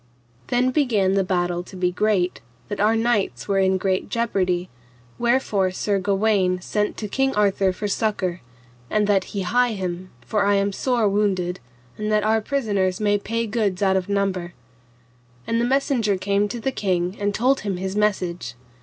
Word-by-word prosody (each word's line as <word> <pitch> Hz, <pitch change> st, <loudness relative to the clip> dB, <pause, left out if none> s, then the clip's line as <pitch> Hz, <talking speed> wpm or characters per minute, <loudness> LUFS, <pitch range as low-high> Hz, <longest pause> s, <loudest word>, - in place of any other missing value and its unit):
Then 250 Hz, +1 st, +2 dB
began 220 Hz, -9 st, +2 dB
the 195 Hz, 0 st, +2 dB
battle 175 Hz, -1 st, 0 dB
to 180 Hz, -, -12 dB
be 180 Hz, -1 st, 0 dB
great, 185 Hz, -2 st, 0 dB, 0.3 s
that 205 Hz, -, -4 dB
our 215 Hz, +2 st, +3 dB
knights 225 Hz, -3 st, 0 dB
were 195 Hz, -1 st, +2 dB
in 190 Hz, 0 st, +3 dB
great 190 Hz, 0 st, -1 dB
jeopardy, 185 Hz, -6 st, 0 dB, 0.5 s
wherefore 235 Hz, -6 st, +2 dB
Sir 200 Hz, +2 st, -1 dB
Gawaine 195 Hz, -2 st, +1 dB
sent 210 Hz, +3 st, -2 dB
to 210 Hz, -, -4 dB
King 270 Hz, +5 st, 0 dB
Arthur 200 Hz, -2 st, +2 dB
for 205 Hz, +3 st, -4 dB
succour, 200 Hz, -4 st, -1 dB, 0.5 s
and 210 Hz, -1 st, +2 dB
that 200 Hz, -2 st, +2 dB
he 200 Hz, -, -4 dB
hie 245 Hz, +5 st, +2 dB
him, 185 Hz, -2 st, -4 dB, 0.2 s
for 210 Hz, -2 st, +1 dB
I 200 Hz, 0 st, +3 dB
am 200 Hz, 0 st, +1 dB
sore 235 Hz, +1 st, +1 dB
wounded, 195 Hz, -3 st, 0 dB, 0.4 s
and 215 Hz, 0 st, -2 dB
that 210 Hz, -1 st, +2 dB
our 220 Hz, +1 st, +2 dB
prisoners 205 Hz, -7 st, 0 dB
may 205 Hz, -1 st, +2 dB
pay 230 Hz, +3 st, -2 dB
goods 205 Hz, -4 st, -1 dB
out 190 Hz, -1 st, +3 dB
of 190 Hz, 0 st, -1 dB
number. 190 Hz, -3 st, -1 dB, 0.9 s
And 230 Hz, 0 st, 0 dB
the -, -, +2 dB
messenger 245 Hz, -6 st, +1 dB
came 200 Hz, +2 st, +1 dB
to 235 Hz, +4 st, -5 dB
the 265 Hz, +4 st, -1 dB
king 180 Hz, -4 st, -1 dB
and 205 Hz, 0 st, 0 dB
told 255 Hz, +6 st, +2 dB
him 195 Hz, -3 st, -3 dB
his 190 Hz, +1 st, -4 dB
message. 185 Hz, -9 st, -1 dB
200 Hz, 175 wpm, -23 LUFS, 185-220 Hz, 0.9 s, our